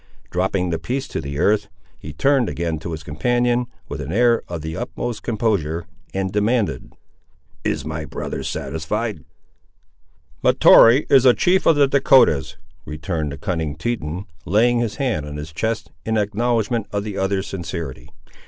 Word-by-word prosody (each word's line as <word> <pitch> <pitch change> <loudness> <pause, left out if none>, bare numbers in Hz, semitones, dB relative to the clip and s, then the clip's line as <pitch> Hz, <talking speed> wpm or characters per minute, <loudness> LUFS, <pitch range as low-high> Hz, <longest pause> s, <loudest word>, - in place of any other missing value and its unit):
Dropping 90 0 0
the 80 - -1
piece 130 +2 -3
to - - -3
the 70 +1 -5
earth, 100 +4 +2 0.3
he 75 - -8
turned 135 - +2
again 80 -2 -2
to 85 +2 -6
his 80 -1 -6
companion 120 +10 0 0.2
with 70 - -5
an 70 +3 -5
air 120 +3 +3
of 85 -3 -6
the 80 0 -4
utmost 105 +7 -4
composure, 100 -8 -1 0.3
and 95 -1 -2
demanded— 105 - 0 0.7
"Is - - -1
my 80 0 -4
brother 65 - -5
satisfied?" 95 +2 -3 1.2
"Mahtoree 120 +6 +7
is 135 -3 +7
a 125 -2 +6
chief 185 +1 +2
of 165 - +6
the 145 -1 +4
Dahcotahs," 130 - +4 0.3
returned 75 -1 -3
the 70 - -7
cunning 80 -1 -2
Teton, 90 -1 -3 0.2
laying 120 +6 +3
his 115 -3 -1
hand 120 - -1
on 75 0 -6
his 75 +2 -7
chest, 110 +5 -2
in 110 0 0
acknowledgment 110 +1 0
of 100 -1 -2
the 105 -2 -4
other's 95 0 0
sincerity. 85 -9 -6
100 Hz, 155 wpm, -21 LUFS, 80-120 Hz, 1.2 s, Mahtoree